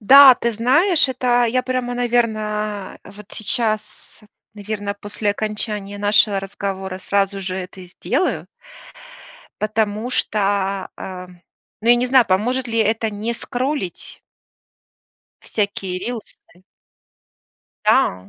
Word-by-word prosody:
Да, 270 +4 +9
ты 235 0 -1
знаешь, 285 - +3
это 245 -1 +2
я 250 +2 +1
прямо, 250 -1 -2
наверное, 215 -4 -1
вот 200 +1 -12
сейчас, 215 -1 -3 0.3
наверное, 205 -1 -4
после 205 0 -2
окончания 210 -1 -3
нашего 205 -1 +3
разговора 195 -1 -5
сразу 195 0 0
же 185 -1 -4
это 185 0 -7
и 180 - -10
сделаю 275 - -1 1.2
Потому 215 +1 -1
что, 200 -4 0
э 185 -1 -7 0.5
ну, 230 - -1
я 240 - +8
не 245 +1 0
знаю, 255 -1 +5
поможет 245 +8 +1
ли 230 0 -2
это 220 0 +1
не 210 +3 -3
скроллить? 250 - -4 1.2
Всякие 200 -3 -2
рилсы? 235 +2 -6 1.5
Да. 90 +1 +2
215 Hz, 110 wpm, -20 LUFS, 200-240 Hz, 1.5 s, Да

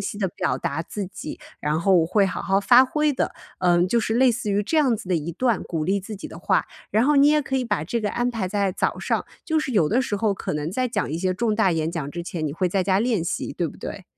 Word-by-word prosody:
晰 - - -4
地 200 -2 0
表 125 -6 -1
达 140 +4 -3
自 195 +3 -5
己， 185 -4 -8 0.2
然 150 +1 0
后 190 +3 +3
我 160 - +2
会 200 +3 +3
好 185 -2 -2
好 195 0 +1
发 245 +5 +7
挥 300 +3 +1
的。 - - -2 0.2
嗯， 175 -1 +3
就 235 +5 +2
是 220 0 -1
类 250 0 +5
似 220 -2 -3
于 200 +1 +1
这 315 +10 +1
样 260 -7 +3
子 185 - -9
的 - - +3
一 165 0 -2
段 235 0 0
鼓 160 -3 -3
励 195 +3 +1
自 205 +3 -7
己 195 - -7
的 - - -10
话。 - - +1 0.4
然 - - +3
后 300 - +4
你 280 +1 +6
也 300 0 +3
可 265 -1 -2
以 255 - 0
把 210 -9 -1
这 230 +8 -2
个 210 -2 -1
安 240 +1 0
排 220 -6 -2
在 200 0 0
早 - - -1
上 - - -1 0.2
就 315 -2 +1
是 270 -4 -2
有 170 -8 +3
的 245 - +2
时 245 -5 -2
候 205 0 +1
可 - - -4
能 150 +2 -2
在 255 +5 0
讲 230 - -2
一 160 - -2
些 185 0 0
重 230 +2 0
大 195 -5 +3
演 160 0 -1
讲 165 -5 -4
之 175 - -4
前， 165 -2 -4
你 145 - -3
会 180 +4 0
在 185 0 0
家 190 +1 +2
练 220 -7 +1
习， 175 - -3
对 175 - -1
不 150 - -9
对？ 190 - -7
200 Hz, 315 characters per minute, -23 LUFS, 175-240 Hz, 0.4 s, 发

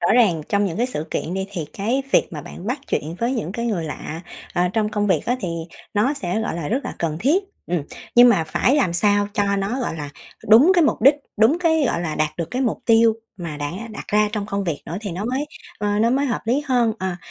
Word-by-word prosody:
rõ 170 - +3
ràng 195 -11 +4
trong 200 0 +2
những 175 -5 -2
cái 240 +3 +1
sự 160 -11 -4
kiện 175 - -2
đi, 190 0 -2
thì 175 -6 -4
cái 235 +7 -1
việc - - +4
mà 150 -3 -6
bạn 180 - -10
bắt 250 +6 -1
chuyện 155 +3 -2
với 235 +3 0
những 185 -9 -3
cái 235 +3 -3
người 190 -8 -1
lạ, 155 +1 -6 0.3
ờ, 180 0 +2
trong 215 -2 +1
công 210 -1 -1
việc 190 - +2
á, 245 +2 +1
thì 185 - -2 0.5
nó 245 +8 +2
sẽ, 190 -5 -2
gọi 225 - -2
là, 165 -4 -4
rất 255 +4 -1
là - - -5
cần 160 -2 -1
thiết, 315 - +3 0.2
ừ. 170 -3 -1 0.3
Nhưng 245 +1 +9
mà 185 -9 +3
phải 250 - +2
làm 240 - +2
sao 205 +3 +3
cho 200 -1 +1
nó, 205 +7 -1
gọi 200 - -2
là, 145 -2 -6 0.4
đúng 260 - +8
cái 345 -3 +5
mục - - +1
đích, 275 +4 +8 0.2
đúng 225 +11 +4
cái, 320 -4 +2
gọi 170 - 0
là, 160 -3 -2
đạt 155 0 -1
được 170 -2 -3
cái 255 +2 -1
mục 235 - 0
tiêu 225 -1 +5 0.3
mà 165 -4 -5
đã 145 0 -3 0.2
đặt 210 - -7
ra 210 0 +3
trong 205 -2 -2
công 200 -1 -2
việc 165 -5 -3
nữa, 170 - -4
thì 205 -4 -5
nó 190 +5 -4
mới, 265 +5 -1 0.3
ờ, 205 0 0
nó 230 +2 +3
mới 275 +2 +1
hợp 245 - -1
lý 255 +6 +1
hơn. 245 -4 +2
Ờ, 185 -1 -2
210 Hz, 260 wpm, -22 LUFS, 175-245 Hz, 0.5 s, Nhưng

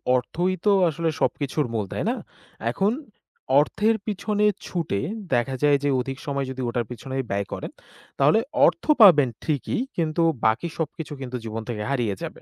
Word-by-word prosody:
অর্থই 175 +9 0
তো 205 - +5 0.2
আসলে 165 +1 -1
সব - - +3
কিছুর 145 +2 0
মূল, 105 -3 -1
তাই - - -2
না? - - 0 0.6
এখন 195 - +1 0.7
অর্থের 215 +9 +2
পিছনে 210 0 0 0.2
ছুটে 165 - -2 0.3
দেখা 125 +2 +1
যায় 145 -1 +5
যে 145 - +2
অধিক 135 +1 -3
সময় 140 -1 -1
যদি 130 0 -5
ওটার 120 -1 -1
পিছনে 130 +3 -6
ব্যয় 100 0 -1
করেন - - -5 0.5
তাহলে 145 +10 +5 0.3
অর্থ - - +2 0.2
পাবেন 150 - +8
ঠিকই 150 - -1 0.2
কিন্তু 165 0 0 0.2
বাকি 115 +10 +2
সবকিছু 160 -1 -4
কিন্তু 125 -1 -4
জীবন 110 0 -4
থেকে 105 -3 -3
হারিয়ে 120 -7 0
যাবে। - - -7
140 Hz, 165 wpm, -24 LUFS, 125-170 Hz, 0.7 s, পাবেন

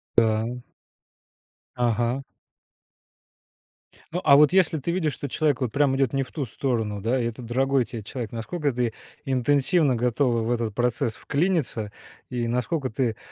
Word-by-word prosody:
Да. 115 +1 +2 1.2
Ага. 120 +2 0 1.9
Ну, 180 - -2
а 140 -2 +7
вот 150 +2 +6
если 185 -4 +4
ты 155 +5 -2
видишь, 165 -5 0
что 145 - -5
человек 145 -2 +1
вот 125 -4 -1
прям 140 -2 +3
идет 135 -4 +1
не 135 -1 +1
в 125 - -13
ту 145 -4 -3
сторону, 110 -5 -2
да, 120 +5 +1
и - - -1
это 115 +1 -4
дорогой 130 +3 +1
тебе 110 -1 -7
человек, 120 +1 -5
насколько 145 +6 -2
ты 120 -2 -1 0.3
интенсивно 140 +3 +2
готова 120 0 +1
в 115 - -1
этот 115 -3 -1
процесс 120 -1 0
вклиниться 145 - -1 0.4
и 120 -2 -2
насколько 130 +4 -1
ты, 115 -1 -1
125 Hz, 155 wpm, -25 LUFS, 115-140 Hz, 1.9 s, а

